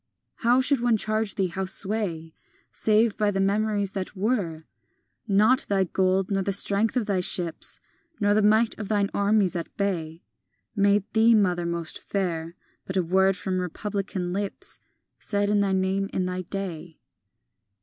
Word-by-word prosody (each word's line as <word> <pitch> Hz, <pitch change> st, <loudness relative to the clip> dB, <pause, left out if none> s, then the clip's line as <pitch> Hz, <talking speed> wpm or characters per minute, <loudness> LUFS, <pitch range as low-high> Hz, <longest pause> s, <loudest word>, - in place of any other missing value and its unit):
VI -, -, -11 dB
How 250 Hz, +2 st, +5 dB
should 275 Hz, 0 st, +2 dB
one 240 Hz, -2 st, +3 dB
charge 215 Hz, 0 st, 0 dB
thee, 190 Hz, -3 st, 0 dB
how 190 Hz, +2 st, -3 dB
sway, 185 Hz, -5 st, -1 dB, 0.4 s
Save 220 Hz, 0 st, +2 dB
by 210 Hz, -1 st, +2 dB
the 195 Hz, -1 st, -1 dB
memories 205 Hz, 0 st, 0 dB
that 195 Hz, 0 st, -5 dB
were? 190 Hz, -6 st, -1 dB, 0.6 s
Not 215 Hz, +6 st, +3 dB
thy 195 Hz, -1 st, +2 dB
gold 190 Hz, +1 st, 0 dB
nor 195 Hz, -1 st, +1 dB
the 200 Hz, -, -1 dB
strength 200 Hz, +4 st, +3 dB
of 235 Hz, -, 0 dB
thy 200 Hz, -3 st, 0 dB
ships, 175 Hz, -2 st, 0 dB, 0.4 s
Nor 205 Hz, -1 st, +3 dB
the 215 Hz, -, +3 dB
might 215 Hz, +2 st, +3 dB
of 210 Hz, -, -5 dB
thine 205 Hz, -2 st, +1 dB
armies 200 Hz, -2 st, +2 dB
at 170 Hz, -1 st, -6 dB
bay, 170 Hz, -5 st, -3 dB, 0.5 s
Made 200 Hz, -1 st, +3 dB
thee, 225 Hz, +1 st, +5 dB
mother, 180 Hz, -4 st, +1 dB
most 170 Hz, -1 st, -4 dB
fair; 170 Hz, -4 st, -3 dB, 0.3 s
But 185 Hz, -, -4 dB
a 185 Hz, -, +2 dB
word 190 Hz, +2 st, +2 dB
from 185 Hz, 0 st, -2 dB
republican 190 Hz, 0 st, -4 dB
lips 200 Hz, +1 st, -5 dB, 0.4 s
Said 205 Hz, -1 st, -1 dB
in 205 Hz, -, +3 dB
thy 200 Hz, -1 st, +1 dB
name 190 Hz, +1 st, 0 dB
in 185 Hz, -, -1 dB
thy 185 Hz, 0 st, -3 dB
day. 175 Hz, -3 st, -6 dB
195 Hz, 165 wpm, -25 LUFS, 185-210 Hz, 0.6 s, How